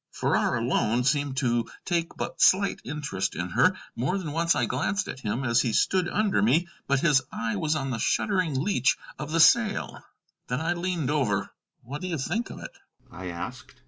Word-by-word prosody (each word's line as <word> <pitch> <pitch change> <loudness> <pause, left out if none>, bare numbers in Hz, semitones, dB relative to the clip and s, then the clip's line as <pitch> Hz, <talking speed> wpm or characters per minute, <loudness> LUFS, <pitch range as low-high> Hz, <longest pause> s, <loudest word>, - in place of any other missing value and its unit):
Farrar - - +1
alone 120 +3 +1
seemed 140 0 0
to 120 -3 0 0.2
take 170 -2 -1
but - - -4
slight 195 +1 +4
interest 135 -11 -3
in 90 +2 -3
her. 185 - +3 0.2
More 130 +11 0
than 170 -6 -4
once 170 +2 +2
I - - +1
glanced 205 0 -1
at - - -6
him 120 +2 -2
as 120 -1 +3
he 120 -2 -1
stood 185 - +2
under 210 - +1
me, 145 - +3 0.2
but 140 -1 +2
his 150 -5 +4
eye 115 -1 -2
was 155 +8 0
on 135 -3 -2
the 115 - -3
shuddering 180 - +1
leach 145 - +2 0.2
of 150 0 -5
the 165 - +1
sail. 215 +4 +3 0.4
Then 125 +1 -1
I 165 +3 0
leaned 175 -5 -2
over. 115 -10 0 0.3
"What 140 +5 -7
do 185 - -4
you 170 -3 -2
think 225 - -2
of - - -8
it?" - - -8 0.4
I 90 +1 -8
asked. 105 +11 -7
145 Hz, 195 wpm, -26 LUFS, 120-175 Hz, 0.4 s, slight